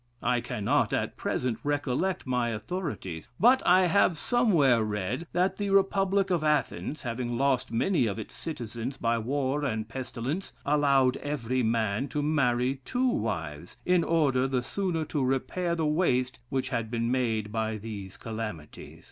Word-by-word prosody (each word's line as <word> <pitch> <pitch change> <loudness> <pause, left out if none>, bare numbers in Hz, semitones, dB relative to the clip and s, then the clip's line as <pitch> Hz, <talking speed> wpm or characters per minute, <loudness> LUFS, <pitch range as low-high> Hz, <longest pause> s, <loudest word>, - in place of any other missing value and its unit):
I 125 0 +2
cannot, 110 -5 0
at - - -1
present, 125 -3 -2
recollect 145 +5 -1
my 125 -2 0
authorities; 115 - -5
but 250 +4 +6
I 185 +1 +6
have 180 -2 +3
somewhere 165 - +3
read, 105 - -3
that 180 +2 +1
the 205 -1 -2
Republic 195 0 +2
of 170 -3 +1
Athens, 150 0 0
having 120 -1 -3
lost 135 -2 +1
many 125 +2 +2
of 100 - -3
its 110 - -7
citizens 120 -3 -5
by 115 -1 +1
war 135 +4 -1
and 110 -5 -2
pestilence, 130 +7 -4
allowed 140 -3 +3
every 130 -3 -2
man 110 +1 0
to 145 0 -2
marry 135 -3 +1
two 255 - +1
wives, 85 - -3
in 180 -1 +3
order 140 -6 +2
the 130 -2 0
sooner 175 0 -2
to 145 -2 -1
repair 135 +7 0
the 160 -2 0
waste 130 -6 +1
which 130 -1 -1
had 115 -3 -2
been 115 0 -1
made 110 -5 0
by 110 0 -1
these 100 -3 -7
calamities. 110 -9 -7
130 Hz, 155 wpm, -28 LUFS, 115-160 Hz, -, but